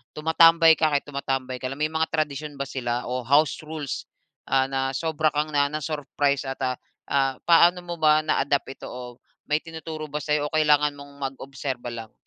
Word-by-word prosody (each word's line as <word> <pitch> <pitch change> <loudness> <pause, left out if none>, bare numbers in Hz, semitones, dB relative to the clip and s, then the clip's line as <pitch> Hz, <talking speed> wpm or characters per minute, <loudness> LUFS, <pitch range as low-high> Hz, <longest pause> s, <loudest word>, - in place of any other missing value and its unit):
tumatambay 165 +1 +6
ka, 160 - +4
kahit 145 -2 +1
tumatambay 135 -2 -3
ka 130 - -3
lang. 135 +3 -6
May 155 - 0
mga 160 0 0
tradisyon 150 -1 -2
ba 140 - -3
sila 125 -3 -3
o 125 -2 -3
house 145 +1 +3
rules, 150 -3 -5 0.4
ah, 135 0 +2
na 135 0 -1
sobra 160 +1 0
kang 150 +1 0
na-ano, 145 +1 +1
na-surprise 145 -2 -1
at, 135 +1 -5
ah, 130 -1 -1 0.3
ah, 135 -1 +2
paano 175 +1 +5
mo 175 -1 -6
ba 155 0 +4
na-adapt 140 -3 0
ito, - - -8
o 125 -1 -9 0.3
may 150 +1 +2
tinuturo 160 -1 -7
ba 150 - -2
sa'yo, 150 0 0
o - - -13
kailangan 150 -1 +3
mong 140 0 -12
mag-obserba 135 -1 -5
lang? 115 -2 -8
145 Hz, 185 wpm, -25 LUFS, 135-155 Hz, 0.4 s, tumatambay